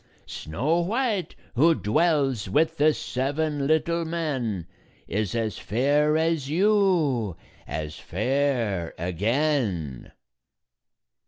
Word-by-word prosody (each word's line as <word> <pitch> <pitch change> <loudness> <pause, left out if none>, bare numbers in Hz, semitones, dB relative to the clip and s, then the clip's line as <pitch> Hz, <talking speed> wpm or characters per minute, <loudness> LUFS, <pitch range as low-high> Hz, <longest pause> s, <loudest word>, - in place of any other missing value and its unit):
Snow 135 - -1
White, 210 - -1 0.2
who 160 +7 +4
dwells 135 - +1
with 160 +9 +2
the 150 +2 +5
seven 145 +1 -2
little 170 +2 +1
men, 135 - -2 0.4
Is 105 +1 -2
as 110 -3 -2
fair 145 +7 +2
as 160 -4 0
you, 165 - +2 0.3
as 75 0 -5
fair 115 -5 -1
again." 95 - -1
140 Hz, 90 wpm, -25 LUFS, 110-160 Hz, 0.4 s, the